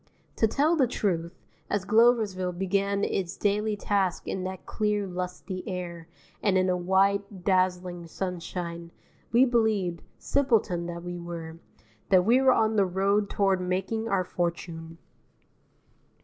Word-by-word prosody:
To 225 - +4
tell 295 +9 +2
the 270 -6 +3
truth, 175 -7 -2 0.3
as 200 -2 -1
Gloversville 215 -6 +3
began 200 +2 0
its 185 -2 -2
daily 210 +1 0
tasks 195 -4 0
in 190 - -3
that 185 0 -6
clear 210 -1 0
lusty 180 0 -5
air 175 -3 -5 0.3
and 195 -3 +2
in 185 0 +2
a 180 - +2
white 190 +1 +1
dazzling 180 -2 0
sunshine, 170 -1 -5 0.4
we 240 +3 +6
believed, 215 -8 +1 0.2
simpleton 225 -11 +1
that 170 0 -6
we 175 0 -5
were, 165 -1 -7 0.5
that 185 -2 +5
we 245 +4 +5
were 265 -1 +6
on 220 -2 +2
the 200 - +4
road 200 +3 +1
toward 195 -3 +1
making 190 +5 -2
our 195 -3 +2
fortune. 170 -2 -4
190 Hz, 135 wpm, -27 LUFS, 175-210 Hz, 0.5 s, we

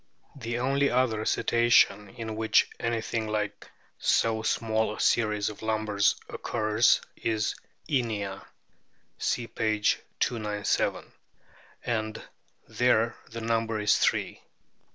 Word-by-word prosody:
The 120 -3 -4
only 135 +3 +2
other 120 -4 +1
Cetacean 115 -3 +3
in 110 +1 -6
which 110 0 +3
anything 115 -1 -2
like 105 -1 -3 0.3
so 110 -1 +2
small 110 -1 0
a - - -11
series 105 -3 +2
of 105 - -10
lumbars 110 -2 +1
occurs 110 0 +2
is 110 -1 -1 0.3
Inia 110 - -2 0.8
(see 120 - -1
p. 110 -2 -1 0.4
297), 105 -3 -1 0.7
and 110 -2 -2 0.5
there 115 -2 +2
the 115 0 -7
number 115 -1 0
is 105 - +3
three. - - 0
110 Hz, 105 wpm, -28 LUFS, 110-115 Hz, 0.8 s, Cetacean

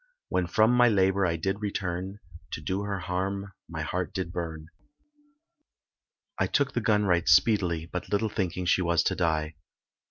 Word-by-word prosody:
When 90 -1 0
from 110 +5 +4
my 125 -1 +5
labour 95 -2 +3
I 85 - 0
did 95 +5 -2
return, 95 -1 -3 0.4
To - - -3
do 95 +6 -2
her 100 -1 -3
harm 95 +2 -3 0.2
my - - -4
heart - - -3
did 95 -3 -3
burn, 80 -3 -5 1.7
I - - +2
took 140 -2 +1
the 120 - 0
gun 105 -2 +2
right 85 -3 +2
speedily, 85 -1 +3
But 90 +1 -6
little 105 +2 +1
thinking 90 -3 -2
she 90 - +3
was 85 -2 +2
to - - 0
die. 80 -2 -1
95 Hz, 165 wpm, -27 LUFS, 85-100 Hz, 1.7 s, my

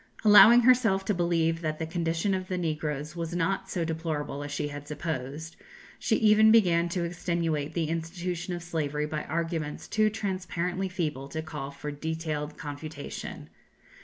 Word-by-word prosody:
Allowing 220 +3 +9
herself 230 -6 +4
to 210 - +1
believe 165 -2 +1
that 155 -2 -2
the 160 - -3
condition 165 +3 -1
of 185 -1 -2
the 185 - -2
negroes 155 -2 -3
was 170 0 -4
not 180 +3 -1
so 170 -2 -1
deplorable 155 -3 -3
as 145 - -6
she 145 0 -2
had 145 0 -8
supposed, 150 0 -5 0.4
she 220 - +1
even 220 0 +6
began 175 -6 +4
to 175 0 -1
extenuate 170 -3 -2
the 170 - +1
institution 170 +2 -3
of 175 - -7
slavery 150 -3 -2
by 150 0 -4
arguments 165 -2 -3
too 215 -1 +2
transparently 185 -2 -2
feeble 150 -7 -3
to 160 +3 -4
call 140 -3 -6
for 145 +1 -6
detailed 155 0 -4
confutation. 145 0 -7
165 Hz, 160 wpm, -28 LUFS, 150-180 Hz, 0.4 s, Allowing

